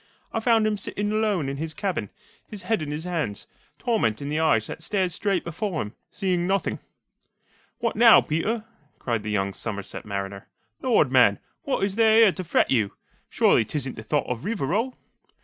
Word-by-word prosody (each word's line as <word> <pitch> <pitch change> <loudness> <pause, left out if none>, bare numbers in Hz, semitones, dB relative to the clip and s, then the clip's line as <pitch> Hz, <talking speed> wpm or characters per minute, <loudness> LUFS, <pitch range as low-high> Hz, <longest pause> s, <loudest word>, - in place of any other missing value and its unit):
I 225 - 0
found 225 -1 +3
him 210 -1 0
sitting 205 +1 -3
alone 210 -8 +1
in 135 0 -3
his 155 +1 -4
cabin, 170 - -2 0.4
his 205 -4 -9
head 220 -1 0
in 150 - -4
his 150 +2 -4
hands, 160 - -3 0.3
torment 215 - 0
in 140 - -5
the 150 +1 0
eyes 150 -9 +3
that - - -7
stared 190 -3 0
straight 195 0 -1
before 170 0 -3
him, 105 -5 -4 0.2
seeing 180 -2 -1
nothing." 195 +1 0 1.0
"What 230 -1 -1
now, 230 +1 +8
Peter?" 210 +9 -1 0.3
cried 115 -3 -2
the 110 - -5
young 100 -1 0
Somerset 100 -2 -5
mariner. 100 -1 -5 0.3
"Lord, - - +3
man, - - +5 0.3
what - - 0
is 195 +1 -1
there 220 -1 +5
here 225 -3 +7
to 185 - -5
fret 170 - +1
you? 110 -6 +2 0.4
Surely - - +4
't 110 - -8
isn't 135 -2 -3
the - - -7
thought 145 +6 0
of 125 -1 -4
Rivarol!" 215 - -1
175 Hz, 185 wpm, -25 LUFS, -, 1.0 s, now